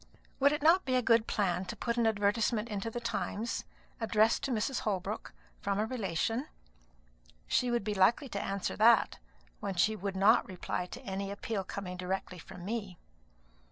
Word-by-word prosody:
"Would 280 Hz, +1 st, +5 dB
it 295 Hz, -1 st, -2 dB
not 340 Hz, +4 st, +6 dB
be 255 Hz, -, 0 dB
a 255 Hz, -, +4 dB
good 230 Hz, -1 st, +4 dB
plan 185 Hz, -3 st, 0 dB
to 180 Hz, -, -5 dB
put 235 Hz, -, -2 dB
an 235 Hz, -2 st, +2 dB
advertisement 215 Hz, +2 st, +1 dB
into 210 Hz, +1 st, -3 dB
the 240 Hz, -, -4 dB
Times, 230 Hz, -1 st, -3 dB, 0.3 s
addressed 225 Hz, 0 st, +3 dB
to 275 Hz, -, -2 dB
Mrs. 240 Hz, +3 st, 0 dB
Holbrook, 195 Hz, -4 st, -3 dB, 0.3 s
from 200 Hz, -1 st, -1 dB
a 210 Hz, -, +1 dB
relation? 225 Hz, -, -1 dB, 1.0 s
She 250 Hz, -, +1 dB
would 240 Hz, -3 st, 0 dB
be 210 Hz, +1 st, -1 dB
likely 220 Hz, +8 st, +3 dB
to 200 Hz, -, -3 dB
answer 195 Hz, -1 st, -2 dB
that, 225 Hz, +1 st, +5 dB, 0.4 s
when 195 Hz, -, -3 dB
she 215 Hz, +5 st, +3 dB
would 200 Hz, -1 st, -4 dB
not 205 Hz, +5 st, +5 dB
reply 180 Hz, -1 st, -3 dB
to -, -, -9 dB
any 195 Hz, 0 st, -3 dB
appeal 200 Hz, 0 st, -3 dB
coming 185 Hz, -1 st, -6 dB
directly 180 Hz, 0 st, -3 dB
from 180 Hz, +1 st, -10 dB
me." 205 Hz, -4 st, -4 dB
210 Hz, 175 wpm, -32 LUFS, 195-235 Hz, 1.0 s, not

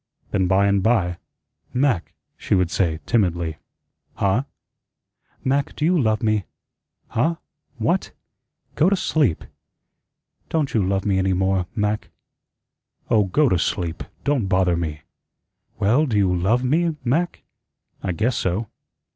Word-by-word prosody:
Then, 95 Hz, -2 st, +1 dB
by 95 Hz, +2 st, +3 dB
and 100 Hz, -1 st, +2 dB
by, 95 Hz, -5 st, +1 dB, 0.5 s
"Mac," 125 Hz, -9 st, 0 dB, 0.2 s
she -, -, 0 dB
would 90 Hz, -2 st, +1 dB
say 85 Hz, -5 st, 0 dB
timidly. 85 Hz, -8 st, 0 dB, 0.6 s
"Huh?" 105 Hz, +7 st, +1 dB, 1.0 s
"Mac, 140 Hz, +1 st, 0 dB
do 150 Hz, -, -1 dB
you 180 Hz, +3 st, +3 dB
love 110 Hz, -9 st, +1 dB
me?" 110 Hz, -3 st, +1 dB, 0.6 s
"Huh? 160 Hz, +9 st, +1 dB, 0.4 s
What? -, -, 0 dB, 0.6 s
Go 160 Hz, +5 st, +3 dB
to 200 Hz, -, +3 dB
sleep." 150 Hz, -, +1 dB, 1.1 s
"Don't 155 Hz, -4 st, 0 dB
you 110 Hz, -, +3 dB
love 95 Hz, +1 st, 0 dB
me 95 Hz, -2 st, +2 dB
any 95 Hz, 0 st, +2 dB
more, 95 Hz, -1 st, +1 dB
Mac?" 105 Hz, -1 st, -1 dB, 1.0 s
"Oh, 110 Hz, -3 st, +4 dB
go 140 Hz, +11 st, +3 dB
to 90 Hz, -7 st, +2 dB
sleep. 85 Hz, -1 st, -2 dB, 0.2 s
Don't 140 Hz, -8 st, +1 dB
bother 90 Hz, -2 st, +2 dB
me." 80 Hz, -3 st, -4 dB, 0.7 s
"Well, 125 Hz, +10 st, +3 dB
do 110 Hz, -5 st, 0 dB
you 95 Hz, -3 st, +3 dB
LOVE 105 Hz, +8 st, +2 dB
me, 160 Hz, +5 st, +1 dB
Mac?" 160 Hz, +8 st, 0 dB, 0.6 s
"I 95 Hz, -, -2 dB
guess 110 Hz, +8 st, 0 dB
so." 95 Hz, +5 st, -1 dB
105 Hz, 135 wpm, -22 LUFS, 90-130 Hz, 1.1 s, Oh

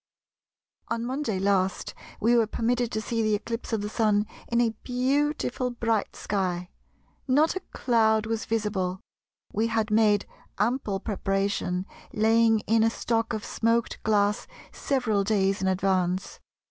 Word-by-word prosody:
— -, -, -54 dB
"On 230 Hz, 0 st, -2 dB
Monday 255 Hz, -5 st, -2 dB
last 190 Hz, -1 st, 0 dB, 0.3 s
we 235 Hz, +3 st, +3 dB
were 230 Hz, -2 st, +4 dB
permitted 240 Hz, +2 st, 0 dB
to 220 Hz, -, -2 dB
see 230 Hz, +1 st, -2 dB
the 215 Hz, -1 st, +2 dB
eclipse 230 Hz, +3 st, -5 dB
of 220 Hz, -2 st, 0 dB
the 205 Hz, -, -3 dB
Sun 210 Hz, -1 st, +2 dB, 0.2 s
in 235 Hz, -, +1 dB
a 230 Hz, -2 st, +2 dB
beautiful 260 Hz, 0 st, 0 dB
bright 230 Hz, -3 st, -1 dB
sky. 180 Hz, -3 st, -2 dB, 0.6 s
Not 295 Hz, +6 st, +3 dB
a -, -, -1 dB
cloud 220 Hz, -3 st, +2 dB
was 225 Hz, 0 st, -2 dB
visible. 205 Hz, -5 st, -1 dB, 0.5 s
We 220 Hz, +2 st, +1 dB
had 220 Hz, -1 st, -1 dB
made 210 Hz, -2 st, +4 dB, 0.3 s
ample 210 Hz, -2 st, 0 dB
preparation, 195 Hz, -2 st, -1 dB, 0.3 s
laying 225 Hz, 0 st, +4 dB
in 225 Hz, +1 st, +2 dB
a 225 Hz, -, +4 dB
stock 225 Hz, 0 st, -1 dB
of 215 Hz, -2 st, -3 dB
smoked 230 Hz, +1 st, 0 dB
glass 210 Hz, -1 st, +1 dB, 0.2 s
several 235 Hz, -7 st, 0 dB
days 195 Hz, -2 st, +1 dB
in 190 Hz, -, +1 dB
advance. 185 Hz, -1 st, 0 dB
220 Hz, 145 wpm, -26 LUFS, 200-230 Hz, 0.6 s, were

